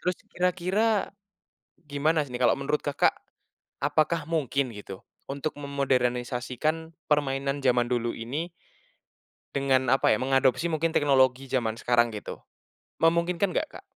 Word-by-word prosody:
terus 180 Hz, -, 0 dB, 0.2 s
kira-kira, 190 Hz, +4 st, +1 dB, 0.8 s
gimana 150 Hz, +2 st, +1 dB
sih 135 Hz, -, -12 dB
nih 125 Hz, -, -4 dB
kalau -, -, +4 dB
menurut 145 Hz, +2 st, 0 dB
Kakak, 145 Hz, -, +3 dB, 0.7 s
apakah 155 Hz, +3 st, +1 dB
mungkin 140 Hz, -5 st, 0 dB
gitu, 100 Hz, -2 st, -9 dB, 0.3 s
untuk 140 Hz, +2 st, -3 dB
memodernisasikan 135 Hz, +3 st, -1 dB, 0.2 s
permainan 140 Hz, -1 st, +1 dB
jaman 125 Hz, -1 st, +3 dB
dulu 120 Hz, -1 st, 0 dB
ini 140 Hz, +10 st, -4 dB, 1.0 s
dengan 135 Hz, -2 st, +2 dB
apa 135 Hz, +1 st, +4 dB
ya -, -, -1 dB
mengadopsi 135 Hz, +5 st, +2 dB
mungkin 160 Hz, 0 st, 0 dB
teknologi 135 Hz, -2 st, +3 dB
jaman 120 Hz, -4 st, 0 dB
sekarang 120 Hz, 0 st, +2 dB
gitu, 105 Hz, -, -6 dB, 0.6 s
memungkinkan 170 Hz, +3 st, +2 dB
nggak, 300 Hz, -, -3 dB
Kak? -, -, -32 dB
140 Hz, 125 wpm, -27 LUFS, 125-160 Hz, 1.0 s, kalau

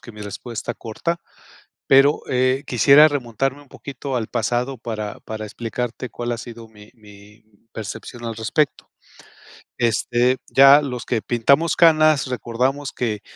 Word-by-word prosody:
que 120 Hz, -, -12 dB
mi 105 Hz, -1 st, -10 dB
respuesta 110 Hz, +3 st, -6 dB
corta, 170 Hz, +10 st, -4 dB, 0.7 s
pero, 135 Hz, +2 st, +4 dB
eh, 130 Hz, +2 st, +1 dB
quisiera 140 Hz, +5 st, +6 dB
remontarme 135 Hz, 0 st, -3 dB
un 145 Hz, -, -22 dB
poquito 135 Hz, 0 st, -6 dB
al 115 Hz, -3 st, -3 dB
pasado 120 Hz, +3 st, -2 dB
para 110 Hz, -3 st, -6 dB
para 110 Hz, -1 st, -7 dB
explicarte 120 Hz, +3 st, -5 dB
cuál 120 Hz, 0 st, -4 dB
ha 120 Hz, -, -4 dB
sido 115 Hz, 0 st, -10 dB
mi 105 Hz, -1 st, -17 dB
mi 105 Hz, 0 st, -18 dB, 0.3 s
percepción 110 Hz, +3 st, -8 dB
al 115 Hz, -1 st, -4 dB
respecto. 120 Hz, +7 st, -1 dB, 0.9 s
Este, 120 Hz, +2 st, +1 dB
ya 140 Hz, +2 st, +7 dB
los 125 Hz, -4 st, -5 dB
que 115 Hz, -3 st, -1 dB
pintamos 140 Hz, +8 st, +2 dB
canas, 155 Hz, -3 st, +4 dB
recordamos 130 Hz, +3 st, -2 dB
que 110 Hz, -4 st, -3 dB
120 Hz, 140 wpm, -21 LUFS, 110-135 Hz, 0.9 s, ya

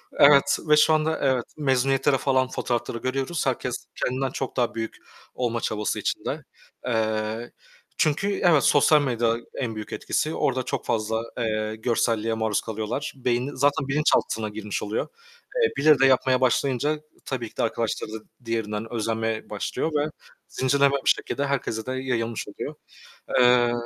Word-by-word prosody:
hı. -, -, -12 dB
Evet 140 Hz, -1 st, +6 dB
ve 150 Hz, -, +7 dB
şu 155 Hz, +1 st, +5 dB
anda 155 Hz, +1 st, +1 dB
evet, 130 Hz, -3 st, +1 dB
mezuniyetleri 135 Hz, -1 st, +2 dB
falan 130 Hz, 0 st, +2 dB
fotoğrafları 120 Hz, -2 st, -2 dB
görüyoruz. 135 Hz, +7 st, -2 dB
Herkes 125 Hz, -1 st, -2 dB
kendinden 130 Hz, +1 st, -1 dB
çok 135 Hz, -1 st, -4 dB
daha 120 Hz, -2 st, +1 dB
büyük 115 Hz, 0 st, -4 dB, 0.4 s
olma 120 Hz, -2 st, -1 dB
çabası 105 Hz, -1 st, -1 dB
içinde. -, -, -3 dB, 0.4 s
Eee, 110 Hz, -1 st, -1 dB, 0.5 s
çünkü 195 Hz, +7 st, +1 dB
evet 160 Hz, -7 st, +5 dB
sosyal 150 Hz, +1 st, +5 dB
medya 120 Hz, -4 st, +1 dB, 0.2 s
en 115 Hz, -4 st, -3 dB
büyük 105 Hz, -1 st, -6 dB
etkisi. 155 Hz, -, -1 dB
Orada 130 Hz, -4 st, 0 dB
çok -, -, -3 dB
fazla, 110 Hz, 0 st, 0 dB, 0.2 s
eee, 110 Hz, -2 st, -1 dB
görselliğe 115 Hz, -1 st, 0 dB
maruz 110 Hz, -2 st, 0 dB
kalıyorlar. 110 Hz, +5 st, -4 dB
Beynin 125 Hz, +1 st, -1 dB
zaten 140 Hz, 0 st, +2 dB
bilinçaltına 135 Hz, -6 st, +1 dB
girmiş 105 Hz, 0 st, -4 dB
oluyor. 105 Hz, +1 st, -2 dB, 0.5 s
Eee, 470 Hz, -2 st, +3 dB
birileri 150 Hz, -1 st, +5 dB
de 135 Hz, -, +6 dB
yapmaya 130 Hz, -1 st, +3 dB
başlayınca 140 Hz, +3 st, +1 dB, 0.3 s
tabii 120 Hz, -4 st, -3 dB
ki -, -, -26 dB
de -, -, +1 dB
arkadaşları 115 Hz, -1 st, -2 dB
da -, -, -3 dB, 0.3 s
diğerinden 110 Hz, -1 st, -3 dB
özenmeye 110 Hz, -1 st, -2 dB
başlıyor 105 Hz, +9 st, -2 dB
ve 150 Hz, +1 st, +1 dB, 0.4 s
zincirlenme 140 Hz, +1 st, +2 dB
bir -, -, +4 dB
şekilde 140 Hz, -, +1 dB
herkese 125 Hz, -5 st, -2 dB
de 130 Hz, -, -4 dB
yayılmış 125 Hz, -4 st, -2 dB
oluyor. -, -, -6 dB, 0.7 s
Eee, 125 Hz, -1 st, +5 dB
125 Hz, 150 wpm, -25 LUFS, 110-140 Hz, 0.7 s, ve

